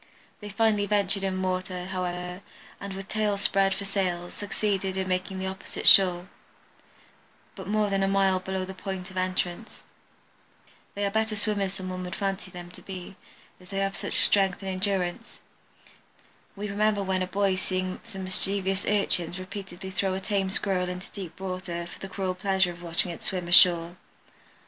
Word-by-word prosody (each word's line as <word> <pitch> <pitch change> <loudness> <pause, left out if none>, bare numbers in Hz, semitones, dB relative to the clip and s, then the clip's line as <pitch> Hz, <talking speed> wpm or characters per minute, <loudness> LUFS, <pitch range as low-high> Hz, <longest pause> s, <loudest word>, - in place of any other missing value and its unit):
They 210 - -7
finally 210 -1 +2
ventured 200 -1 +2
in 190 -1 0
the - - +1
water, 185 -1 -2
however, 180 0 -3 0.4
and 200 -1 -6
with 195 0 -7
tails 210 -2 0
spread 195 -1 +3
for 200 - -5
sails, 180 -3 -1
succeeded 200 -2 -1
in 190 0 -1
making 185 +1 -1
the 190 - -3
opposite 190 0 -4
shore, 180 -2 +7 1.3
but 190 -2 -8
more 210 0 +1
than 195 0 +2
a 195 - +3
mile 195 -1 +3
below 190 0 -3
the 190 - -7
point 190 0 -5
of 185 - -9
entrance. 185 +2 -2 1.1
They 205 0 0
are 200 - 0
better 220 0 +1
swimmers 205 -2 0
than 185 -1 -6
one 185 0 -4
would 180 - -5
fancy 195 -1 -2
them 175 -1 -9
to - - -11
be, 190 0 -8 0.4
as 180 0 -17
they 195 - -4
have 195 0 -1
much 205 - -2
strength 195 -1 +4
and 190 - -2
endurance. 185 -2 -1 1.1
We 205 +1 -4
remember 205 0 +1
when 190 -1 0
a 185 - 0
boy 195 +1 +2
seeing 185 0 -2
some 190 -1 -7
mischievous 195 +1 0
urchins 185 -4 +1
repeatedly 190 0 -7
throw 190 0 0
a - - -2
tame 195 -1 0
Squirrel 190 -2 +1
into 180 +1 -7
deep 190 -2 -8
water 185 -2 -4
for 170 - -11
the 195 - -7
cruel 190 -1 -2
pleasure 190 -1 +2
of 175 0 -11
watching 170 +1 +1
it 170 - -8
swim 180 -2 -2
ashore. 175 -1 +6
190 Hz, 180 wpm, -27 LUFS, 185-200 Hz, 1.3 s, shore